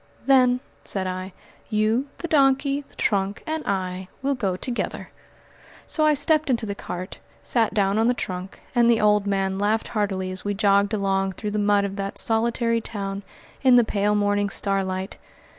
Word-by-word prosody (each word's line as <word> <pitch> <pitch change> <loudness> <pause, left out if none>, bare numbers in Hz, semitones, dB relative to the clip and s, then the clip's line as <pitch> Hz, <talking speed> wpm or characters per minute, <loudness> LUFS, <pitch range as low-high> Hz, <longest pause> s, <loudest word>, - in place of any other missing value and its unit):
"Then," 255 -2 +4 0.2
said 190 -2 -1
I, 185 +1 -4 0.4
"you, 220 +5 +1
the 340 - -5
donkey, 275 -2 +3
the - - -24
trunk, 200 -1 -1
and 315 -1 -3
I 185 -1 -2 0.2
will 280 +1 +1
go 200 -8 -1
together." 240 +4 -4 0.7
So 310 - +1
I 305 - +4
stepped 310 +1 +2
into 235 -3 +1
the 200 - -3
cart, 185 -2 -7 0.2
sat 230 -2 +1
down 200 0 +2
on 225 - +3
the 245 - +2
trunk, 185 -3 -6
and 240 -2 +4
the 230 -1 +4
old 210 -1 +3
man 195 -1 0
laughed 215 +2 0
heartily 195 -3 -1
as 185 - -5
we 205 0 -2
jogged 200 +1 +3
along 195 -1 0
through 210 +2 -5
the 210 - -1
mud 205 -1 +3
of 200 0 -5
that 195 0 -4
solitary 230 +1 +1
town 200 -2 -4 0.4
in 260 -2 +6
the 240 - +7
pale 210 -1 0
morning 205 0 +1
starlight. 195 -1 -2
205 Hz, 175 wpm, -24 LUFS, 195-235 Hz, 0.7 s, the